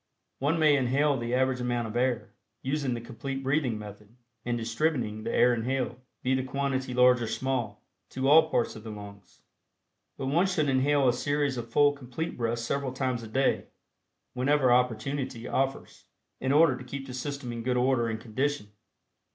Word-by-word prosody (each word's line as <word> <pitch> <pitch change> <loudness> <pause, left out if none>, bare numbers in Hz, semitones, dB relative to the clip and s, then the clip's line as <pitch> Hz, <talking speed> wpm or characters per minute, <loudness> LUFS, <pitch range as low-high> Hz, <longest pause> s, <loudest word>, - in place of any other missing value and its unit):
One 145 +5 +1
may 155 -2 +5
inhale 140 +2 +2
the 120 -1 -2
average 130 0 +1
amount 120 -1 -1
of 110 - -7
air, 125 -1 0 0.3
using 135 -2 -1
the 120 - -5
Complete 135 +4 -6
Breathing 135 -4 +1
Method 105 +1 -11 0.3
and 120 0 -1
distributing 115 -2 -1
the - - -3
air 125 - +4
inhaled, 125 +1 -1 0.3
be 130 - +2
the 130 - +1
quantity 130 -1 -2
large 125 0 +5
or 115 - -2
small, 130 -2 -2 0.3
to 130 +1 -2
all 160 +2 +7
parts 120 - 0
of 110 - -10
the 115 - -7
lungs. 100 -2 -11 0.7
But 135 - -4
one 165 +8 +2
should 155 -6 +1
inhale 135 +1 +3
a 120 - +4
series 145 +2 0
of 120 -1 -5
full 145 +4 +4
Complete 140 +4 -5
Breaths 115 -1 -2
several 135 +1 -2
times 130 -2 -1
a 115 - -8
day, 130 +5 +1 0.7
whenever 130 0 +3
opportunity 125 +1 -1
offers, 135 0 -2 0.3
in 130 - 0
order 150 -2 +5
to - - -8
keep 135 +2 -6
the 130 - -8
system 130 0 -4
in 115 - -5
good 125 +1 0
order 125 -2 +2
and 110 -1 -3
condition. 125 -1 -2
130 Hz, 180 wpm, -28 LUFS, 120-140 Hz, 0.7 s, all